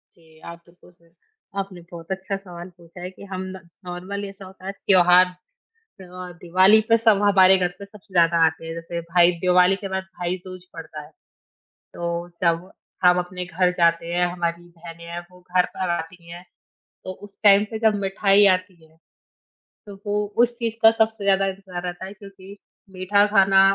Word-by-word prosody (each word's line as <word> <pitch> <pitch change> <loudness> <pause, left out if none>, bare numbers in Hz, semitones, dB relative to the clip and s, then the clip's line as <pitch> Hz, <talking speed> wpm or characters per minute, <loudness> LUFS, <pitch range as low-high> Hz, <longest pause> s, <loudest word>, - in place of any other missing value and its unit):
जी, 160 -2 -22
आप 170 0 -9
बिल्कुल 175 +1 -21
सही 170 -1 -28 0.5
आपने 195 -2 -5
बहुत 170 -1 -11
अच्छा 190 +1 -4
सवाल 180 -2 -10
पूछा 170 0 -15
है 180 - -5
कि 190 - -14
हम 185 0 -3
न - - -12 0.2
नॉर्मली 185 +3 -6
ऐसा 195 0 -12
होता 185 0 -13
है 195 - -3
त्योहार, 180 -2 +5 0.5
अ, 185 - -12
दिवाली 185 +5 +5
पे 230 - +6
सब 220 -3 +3
हमारे 190 -2 +6
घर 180 -1 +1
पे 200 - -9
सबसे 200 -1 -18
ज़्यादा 170 -1 +4
आते 160 +1 -4
हैं, 165 - -5
जैसे 170 +1 -6
भाई 170 +1 +3
दिवाली 180 +1 +4
के 195 0 -7
बाद 190 0 -3 0.2
भाई-दूज 180 +1 -5
पड़ता 160 -2 -9
है। 150 - -16 0.8
तो 170 0 -4
जब 170 +1 0 0.3
हम 180 0 +6
अपने 180 0 -5
घर 180 +1 +1
जाते 170 0 +1
हैं, 180 0 +2
हमारी 170 -1 -3
बहनें 170 0 -12
हैं, 170 +1 -6
वो 180 - -18 0.2
घर 180 - +5
पर 185 -1 -2
आती 170 0 -5
हैं 175 +1 -10 0.6
तो 185 - -4
उस 205 - -12
टाइम 205 -1 +6
पे 220 - -4
जब 220 -1 +3
मिठाई 195 +1 +3
आती 185 0 +1
है, 160 0 -27 0.9
तो 205 - -9
वो 205 - -1 0.3
उस 240 0 +1
चीज़ 230 -2 -2
का 225 - +9
सबसे 220 -2 0
ज़्यादा 195 0 +3
इंतज़ार 190 -2 -6
रहता 180 +1 -5
है 195 - -9
क्योंकि 195 -1 -13 0.3
मीठा 190 +2 +2
खाना 195 -2 +4
185 Hz, 185 wpm, -22 LUFS, 175-195 Hz, 0.9 s, का